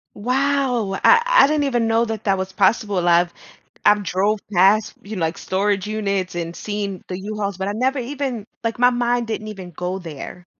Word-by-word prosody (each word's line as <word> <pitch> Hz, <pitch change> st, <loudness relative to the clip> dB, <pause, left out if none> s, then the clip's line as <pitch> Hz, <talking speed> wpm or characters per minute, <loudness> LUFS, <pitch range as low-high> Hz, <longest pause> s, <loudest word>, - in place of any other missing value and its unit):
Wow, 255 Hz, -2 st, 0 dB
I 465 Hz, -, +7 dB
I -, -, +6 dB
didn't 300 Hz, 0 st, +1 dB
even 240 Hz, -4 st, +1 dB
know 225 Hz, +1 st, +3 dB
that 220 Hz, -1 st, -5 dB
that 195 Hz, -2 st, +2 dB
was 190 Hz, 0 st, -4 dB
possible. 200 Hz, -2 st, +1 dB
I've 175 Hz, 0 st, +4 dB, 0.5 s
I've 210 Hz, 0 st, +5 dB
drove 200 Hz, +4 st, 0 dB
past, 195 Hz, +4 st, +4 dB
you 215 Hz, +2 st, -7 dB
know, 185 Hz, -, -4 dB
like, 160 Hz, +1 st, -3 dB
storage 200 Hz, +1 st, -1 dB
units 200 Hz, -4 st, -2 dB
and 170 Hz, 0 st, -3 dB
seen 205 Hz, -3 st, -4 dB
the 180 Hz, -, -4 dB
U-Hauls, 200 Hz, -1 st, -4 dB
but 190 Hz, +1 st, -3 dB
I -, -, -1 dB
never 260 Hz, +5 st, 0 dB
even, 255 Hz, -4 st, -4 dB, 0.2 s
like, 230 Hz, 0 st, -2 dB
my 245 Hz, 0 st, +6 dB
mind 240 Hz, -1 st, 0 dB
didn't 215 Hz, -1 st, -4 dB
even 190 Hz, -4 st, -8 dB
go 180 Hz, +2 st, -4 dB
there. 170 Hz, +2 st, -9 dB
210 Hz, 195 wpm, -21 LUFS, 190-240 Hz, 0.5 s, I